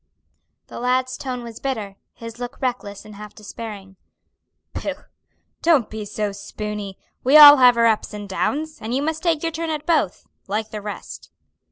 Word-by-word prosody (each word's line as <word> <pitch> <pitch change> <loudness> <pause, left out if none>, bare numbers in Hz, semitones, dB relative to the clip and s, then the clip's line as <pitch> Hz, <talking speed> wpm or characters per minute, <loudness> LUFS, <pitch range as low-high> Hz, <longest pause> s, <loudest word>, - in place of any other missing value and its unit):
The - - -9
lad's 255 +1 0
tone 255 -3 -5
was 230 -1 -9
bitter, 220 -8 -4 0.2
his 230 0 -9
look 245 -1 -6
reckless 240 -6 -3
and 215 - -11
half 210 0 -11
despairing. 205 -3 -9 0.8
"Pooh, - - -5 0.6
don't 300 -10 +3
be 220 0 -5
a 205 0 -3
spooney! 205 -1 -6 0.3
We 270 +4 +6
all 295 -1 +12
have 250 -2 +6
our 230 - +4
ups 220 -2 +1
and 205 -1 -7
downs, 305 +10 -2
and 225 +3 -3
you 275 - 0
must 315 +1 -2
take 330 -3 0
your 330 - 0
turn 330 +1 -4
at 305 -2 -3
both, 310 - 0 0.2
like 215 +2 -3
the 210 - -5
rest." 205 0 -8
230 Hz, 175 wpm, -22 LUFS, 210-275 Hz, 0.8 s, all